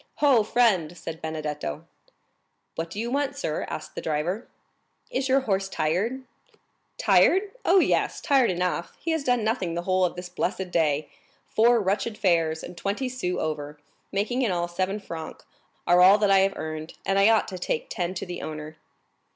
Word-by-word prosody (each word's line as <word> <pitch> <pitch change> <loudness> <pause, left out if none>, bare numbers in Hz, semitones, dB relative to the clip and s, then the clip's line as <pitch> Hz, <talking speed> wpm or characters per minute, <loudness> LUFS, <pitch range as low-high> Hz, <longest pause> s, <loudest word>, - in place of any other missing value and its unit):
"Ho, 275 -6 +4
friend!" 205 -7 +2
said 165 0 -7
Benedetto. 150 - -4 0.9
"What 165 0 -4
do 200 - -6
you 235 +2 -2
want, 280 +1 0
sir?" 155 - -2
asked - - -6
the - - -5
driver. 165 +8 -2 0.6
"Is 275 - -1
your 270 +1 +4
horse 195 -5 -1
tired?" 195 +12 -1 0.7
"Tired? 395 +2 +4
oh, 370 - +5
yes, - - +1
tired 270 -4 +3
enough—he 180 - -2
has 320 -3 0
done 245 -4 +1
nothing 210 -6 -1
the 175 - -2
whole 185 0 +2
of 180 - 0
this 180 0 -6
blessed 180 +1 -3
day! 150 -3 +1 0.4
Four 235 +2 +4
wretched 210 +3 -1
fares, 165 -5 +1
and 180 - -8
twenty 200 +9 -2
sous 210 -8 -3
over, 150 -1 -3 0.3
making 220 +6 0
in 235 -6 +1
all 175 -1 -1
seven 185 +4 -2
francs, 165 -5 -8 0.4
are 175 +1 +5
all 190 +3 +8
that 205 -2 +2
I 195 - +6
have 195 0 +1
earned, 155 0 -6
and 195 0 +2
I 200 +2 +6
ought 225 -1 +3
to 185 -2 -6
take 160 - -2
ten 180 +1 -3
to - - -4
the 175 -1 -6
owner." 155 0 -7
185 Hz, 175 wpm, -26 LUFS, 165-230 Hz, 0.9 s, all